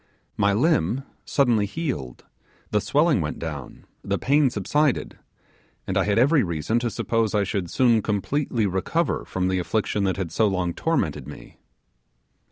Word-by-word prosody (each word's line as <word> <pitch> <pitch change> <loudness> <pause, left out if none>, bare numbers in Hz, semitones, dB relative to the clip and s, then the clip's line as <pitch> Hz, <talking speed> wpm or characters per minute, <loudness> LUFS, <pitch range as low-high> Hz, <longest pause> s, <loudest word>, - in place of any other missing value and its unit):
My 100 - +2
limb 125 - +1 0.2
suddenly 120 -7 +2
healed, 125 - -5 0.5
the 105 - +2
swelling 150 - +2
went 75 -1 -3
down, 75 -5 -7 0.2
the - - -1
pain 145 +1 +3
subsided, 135 +6 0 0.7
and - - -3
I - - +2
had 100 0 +1
every 140 +5 +4
reason 85 +5 -1
to 120 0 -1
suppose 115 -1 -1
I 105 - +3
should 100 -3 -3
soon 120 -1 +3
completely 110 +3 -1
recover 95 -2 -1
from 90 -1 -2
the 95 0 0
affliction 105 +2 -1
that 95 -1 0
had 90 -4 -3
so 110 +5 +2
long 90 -3 -1
tormented 75 - -1
me. 75 - -12
105 Hz, 155 wpm, -24 LUFS, 90-130 Hz, 0.7 s, every